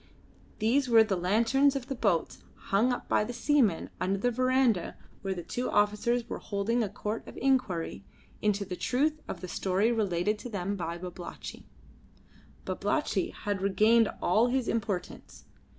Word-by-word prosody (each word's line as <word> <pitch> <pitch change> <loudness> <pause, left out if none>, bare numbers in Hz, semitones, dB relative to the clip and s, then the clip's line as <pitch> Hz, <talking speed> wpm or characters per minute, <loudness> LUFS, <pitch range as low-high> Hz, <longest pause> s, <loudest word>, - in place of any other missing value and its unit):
These 250 +5 +2
were 225 -1 +7
the 210 -3 -1
lanterns 230 +10 +3
of 270 -3 -3
the 270 - -4
boats 205 -9 0 0.2
hung 220 +6 +1
up 245 - -4
by - - +2
the 240 +3 -5
seamen 235 - +2
under 190 +2 0
the 245 +5 +1
verandah 255 -5 +1 0.2
where 195 -1 -2
the 175 - -6
two 250 +8 -3
officers 210 +4 +1
were - - -5
holding 215 +4 -1
a 215 - -1
court 210 +2 -5
of - - -10
inquiry 215 - 0 0.4
into 205 -1 +1
the 180 -1 -5
truth 300 - 0
of - - -6
the 185 - -5
story 195 +5 +1
related 210 -2 0
to 245 - -7
them 200 -2 -2
by 170 -2 -4
Babalatchi. 175 0 -8 1.0
Babalatchi - - -1
had 205 -2 -4
regained 215 +3 +4
all 215 +7 +4
his 255 -1 0
importance. 200 -5 -4
215 Hz, 160 wpm, -29 LUFS, 190-245 Hz, 1.0 s, were